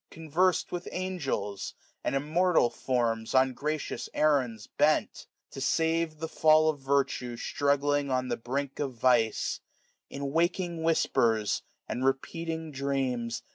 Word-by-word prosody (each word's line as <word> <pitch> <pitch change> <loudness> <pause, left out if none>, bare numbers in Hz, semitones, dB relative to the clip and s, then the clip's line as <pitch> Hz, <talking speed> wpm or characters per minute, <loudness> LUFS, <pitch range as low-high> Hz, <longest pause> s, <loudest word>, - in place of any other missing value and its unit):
Conversed' 165 +3 +1
widi 175 0 -4
angels, 135 - -3 0.3
and - - -1
immortal 160 0 +2
forms, 115 -3 -1
^ag 130 - +7
On 130 0 +2
gracious 150 +3 -3
errands 130 -8 +1
bent: - - +1 0.2
to 135 - -7
save 160 +2 +1
the 160 +1 -4
fall 155 0 +4
Of 145 - -11
virtue 135 -3 0
struggling 145 +1 +1
on 130 -1 0
the 120 - -1
brink 135 +4 -4
of 135 -3 -2
vice; 115 -2 +2 0.5
In 140 0 -4
waking 170 +1 0
whispers, 115 -9 +2 0.3
and 125 - -3
repeated 160 +4 -2
dreams. 130 -4 -2
140 Hz, 130 wpm, -29 LUFS, 125-160 Hz, 0.5 s, ^ag